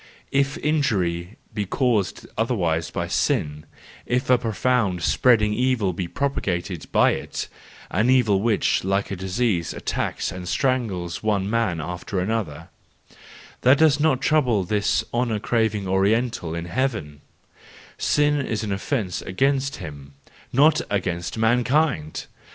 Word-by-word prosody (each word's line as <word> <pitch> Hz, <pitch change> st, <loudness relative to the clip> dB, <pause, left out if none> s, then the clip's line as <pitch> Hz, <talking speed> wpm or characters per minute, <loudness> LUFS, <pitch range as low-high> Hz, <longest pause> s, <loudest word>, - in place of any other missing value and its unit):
If 140 Hz, 0 st, +1 dB
injury 100 Hz, -, 0 dB, 0.2 s
be 105 Hz, -2 st, -2 dB
caused 110 Hz, -5 st, 0 dB
otherwise 90 Hz, -9 st, 0 dB
by -, -, -3 dB
sin, 75 Hz, +1 st, -1 dB, 0.4 s
if 125 Hz, +1 st, 0 dB
a 125 Hz, -, +7 dB
profound, 110 Hz, -5 st, 0 dB
spreading 105 Hz, -1 st, +3 dB
evil 120 Hz, -6 st, +1 dB
be 90 Hz, +1 st, -3 dB
propagated 95 Hz, -, -3 dB
by -, -, +4 dB
it, -, -, -4 dB, 0.4 s
an 105 Hz, +6 st, +2 dB
evil 115 Hz, -7 st, +4 dB
which, 110 Hz, -2 st, +1 dB
like 95 Hz, +2 st, 0 dB
a -, -, -1 dB
disease, 95 Hz, -, -1 dB
attacks -, -, -2 dB
and 90 Hz, -1 st, -7 dB
strangles 95 Hz, -4 st, -1 dB
one 105 Hz, -3 st, 0 dB
man 110 Hz, -6 st, 0 dB
after 90 Hz, +4 st, -4 dB
another—that 100 Hz, -, -3 dB
does 150 Hz, -2 st, +4 dB
not 145 Hz, -4 st, +2 dB
trouble 130 Hz, -10 st, +2 dB
this 100 Hz, +2 st, +1 dB
honour 120 Hz, -2 st, 0 dB
craving 110 Hz, -2 st, 0 dB
Oriental 95 Hz, -2 st, +1 dB
in 85 Hz, 0 st, -4 dB
heaven; 85 Hz, -, -2 dB, 0.8 s
sin 145 Hz, -1 st, +2 dB
is 110 Hz, -3 st, -2 dB
an 105 Hz, -, -3 dB
offence 100 Hz, -, -2 dB
against 135 Hz, +6 st, 0 dB
him, 70 Hz, -2 st, -9 dB, 0.4 s
not 150 Hz, +4 st, +4 dB
against 90 Hz, -2 st, -2 dB
mankind! 120 Hz, -, +1 dB
105 Hz, 125 wpm, -23 LUFS, 90-125 Hz, 0.8 s, a